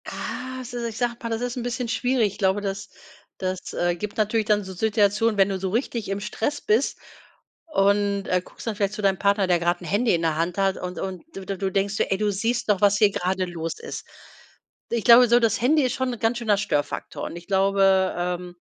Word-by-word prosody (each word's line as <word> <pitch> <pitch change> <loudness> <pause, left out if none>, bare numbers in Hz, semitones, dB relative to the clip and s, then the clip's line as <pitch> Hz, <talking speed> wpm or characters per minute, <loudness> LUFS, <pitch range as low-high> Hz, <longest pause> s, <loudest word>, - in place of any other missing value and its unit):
Ah, 255 0 -5
se 240 -1 -4
ich 220 - -9
sage 240 -1 0
mal, 230 - -4
das 225 0 -2
ist 245 0 -3
'n 245 - -3
bisschen 245 0 -3
schwierig. 230 -2 +1
Ich - - -13
glaube, 195 0 +2
das 195 -1 -4 0.5
das, 185 -1 -4
äh, 175 0 0
gibt 205 +4 -6
natürlich 215 0 +1
dann 210 -1 +2
so 190 - -8
Situationen, 210 +2 +2
wenn 195 0 +4
du 195 -1 -2
so 190 0 -2
richtig 230 -1 -2
im 195 0 -2
Stress 225 +7 -3
bist 220 +6 +1 0.7
und, 200 -5 +1
äh, 180 - +2
guckst - - -13
dann 225 - -1
vielleicht 200 -1 -1
zu 210 - -5
deinem 195 -1 +2
Partner, 200 -1 +2
der 175 -1 +3
grad 175 +1 0
'n - - -8
Handy 225 +4 +2
in 165 - -2
der 160 -2 +1
Hand 170 +3 -1
hat 195 0 +2
und 180 0 -5
und 190 -1 -5
du 195 - -6
du 195 - -3
du 190 0 -2
denkst 195 +1 0
so: - - +2
„Ey, 195 - -1
du 210 -1 +1
siehst 230 +4 -1
doch, 200 -3 +2
was 205 0 +4
hier 210 - +6
gerade 185 0 -1
los 165 -2 -4
ist.“ - - -7 0.8
Ich 235 -2 -1
glaube 240 +1 +8
so, 240 +1 +6
das 230 -2 +1
Handy 295 +4 +4
ist 255 -1 0
schon 260 -1 -1
'n 240 - -8
ganz 225 +1 +1
schöner 215 -4 +2
Störfaktor 145 -8 -2
und - - -6
ich 175 0 -9
glaube, 195 -1 +3
ähm, 180 0 -3
205 Hz, 240 wpm, -24 LUFS, 190-230 Hz, 0.8 s, glaube